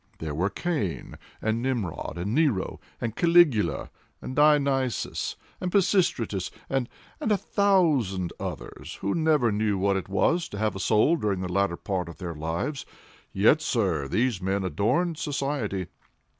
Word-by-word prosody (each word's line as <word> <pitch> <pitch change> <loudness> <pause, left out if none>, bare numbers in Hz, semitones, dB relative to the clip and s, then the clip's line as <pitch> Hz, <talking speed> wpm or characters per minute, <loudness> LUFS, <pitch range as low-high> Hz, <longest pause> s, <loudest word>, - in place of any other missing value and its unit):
There 80 -2 -4
were 90 +6 0
Cain 110 - -3 0.3
and 110 +1 0
Nimrod, 115 -10 -2
and 95 +5 -2
Nero, 140 -10 +1 0.2
and 115 -2 -3
Caligula, 170 -10 +3 0.3
and 130 - -6
Dionysius, 140 -4 +2 0.3
and 180 - -2
Pisistratus, 170 - +1 0.2
and—and 135 - -3
a 210 - +4
thousand 155 - +2
others, - - -6
who 100 - 0
never 155 -7 +3
knew 105 -1 +1
what 100 +1 +2
it 95 -1 -5
was 165 - +1
to 100 - -7
have 105 -1 0
a - - -5
soul 110 - +3
during 100 - -1
the 90 -1 -4
latter 100 -3 +1
part 90 -4 -3
of 85 - -10
their 85 -3 -5
lives; 85 - -3 0.5
yet, 110 +11 +4
sir, 95 - 0
these 110 - 0
men 95 +1 0
adorned 150 - 0
society. 135 -10 -2
110 Hz, 145 wpm, -26 LUFS, 95-150 Hz, 0.5 s, a